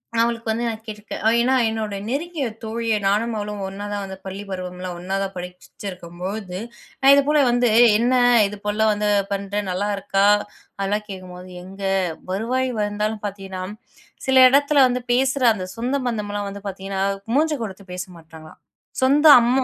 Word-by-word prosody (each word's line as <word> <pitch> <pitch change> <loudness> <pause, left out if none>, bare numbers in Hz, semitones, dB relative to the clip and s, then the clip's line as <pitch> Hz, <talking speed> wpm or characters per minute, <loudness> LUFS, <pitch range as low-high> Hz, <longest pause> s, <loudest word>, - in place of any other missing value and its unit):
நான் 230 - +4
அவளுக்கு 230 -1 -2
வந்து 235 +2 -1
நான் 220 -1 -4
கேட்டுருக்கேன். 210 -1 -7 0.2
ஏன்னா, 255 +2 +2
என்னோட 220 -2 -3
நெருங்கிய 295 +2 -2 0.2
தோழியா 225 0 -1
நானும் 220 +4 +1
அவளும் 210 -1 -4
ஒண்ணா 200 +2 -7
தான் 205 -1 -2
வந்து 190 0 -8
பள்ளிப்பருவம் 190 -2 -6
எல்லாம் 180 -1 -5
ஒண்ணா 190 +2 -3
தான் 195 0 -3
படிச்சுச்சிருக்கம் 180 -1 -9
பொழுது, 190 -1 -4 0.4
நான் 270 +1 +7
இதுபோல 295 +2 +3
வந்து 245 0 +3 0.3
என்ன 240 +3 +1 0.3
இது 205 +1 -8
போலல்லாம் 215 +1 +2
வந்து 210 0 -1 0.2
பண்ற 200 0 -4 0.2
நல்லா 185 +3 -1
இருக்கா? 195 0 +1 0.5
அதெல்லாம் 205 +2 -1
கேட்கும்போது 185 -1 -9
எங்க 195 +2 -11 0.5
வருவாய் 250 +6 0
வந்தாலும் 210 +1 -2
பார்த்தீங்கன்னா, 195 -2 -5 0.6
சில 265 0 +4
இடத்தில 285 +1 +4
வந்து 250 0 -2
பேசுற 265 +1 +1
அந்த 185 -3 -5
சொந்த 245 +4 -2
பந்தம்லாம் 205 -3 -3
வந்து 200 0 -9
பாத்தீங்கன்னா, 195 0 -3 0.3
மூஞ்ச 310 +2 +3
கொடுத்து 200 -2 -8
பேச 180 - -4
மாட்டாங்களாம். 160 -1 -14 0.4
சொந்த 285 +4 +4 0.2
அம்மா 250 +3 +2
205 Hz, 155 wpm, -22 LUFS, 195-235 Hz, 0.6 s, நான்